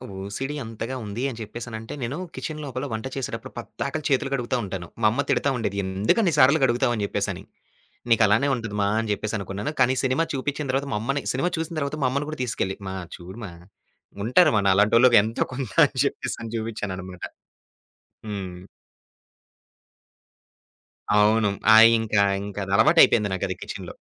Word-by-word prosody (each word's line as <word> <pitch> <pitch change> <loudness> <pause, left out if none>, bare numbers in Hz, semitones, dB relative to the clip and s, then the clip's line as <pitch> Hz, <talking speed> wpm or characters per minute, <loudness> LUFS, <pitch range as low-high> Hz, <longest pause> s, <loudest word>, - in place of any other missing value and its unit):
OCD 100 +9 -4
అంతగా 115 +3 -5
ఉంది 105 +3 -5
అని 120 - -8
జెప్పేసనంటే, 110 0 -7
నేను 125 +4 -3 0.2
కిచెన్ 155 -1 -5
లోపల 130 0 -4
వంట 110 +2 -4
చేసేటప్పుడు 135 -2 -5
పొద్దకలు 155 - -5
చేతులు 135 0 +1
గడుగుతా 125 -1 -1
ఉంటాను. 95 -3 -5
మా 110 - +5
అమ్మ 125 - 0
తిడతా 140 - +2
ఉండేది. 100 -4 -3
"ఎందుకు 95 - +1
అన్ని 175 -5 +2
సార్లు 140 +3 +6
గడుగుతావు" 120 0 +2
అని 105 - -2
జెప్పేసని. - - -3 0.7
నీకు 115 0 +5
అలానే 110 +7 +3
ఉంటది 115 -4 -5
మా 100 - +2
అని 110 -1 -3
జెప్పేసి 110 +2 -2
అనుకున్నాను. 100 +7 -4
కానీ 130 0 +4
సినిమా 130 +5 +2
చూపించిన 145 +2 -3
తరువాత 135 +2 -1
మా - - 0
అమ్మని 135 +4 -2
సినిమా 135 +7 0
చూసిన 160 +1 -3
తరువాత 140 +1 -3
మా - - +4
అమ్మని 140 +2 -2
గూడా 155 - -6
తీసుకెళ్ళి 95 -5 -2
మా 95 - -5 0.2
చూడు 90 +6 -11
మా. 90 - -8 0.7
ఉంటారు 155 +7 +5
మా 100 - +3
నాలంటోలకి 115 +5 +5
ఎంతో 110 +2 -1
కొంత 130 -5 -4 0.2
అని - - -15
జెప్పేసని 115 -1 -3
చూయించాననమాట. 95 -5 -5 1.1
హ్మ్. 95 -4 -6 2.6
అవును. 105 0 +4 0.2
ఆ! - - +9 0.2
ఇంకా 110 -2 +1 0.3
ఇంకా 105 0 -7
అది 95 - -6
అలవాటయిపోయింది 115 -4 +5
నాకది 95 - -2
కిచెన్‌లో. - - -7
115 Hz, 160 wpm, -24 LUFS, 105-135 Hz, 2.6 s, ఆ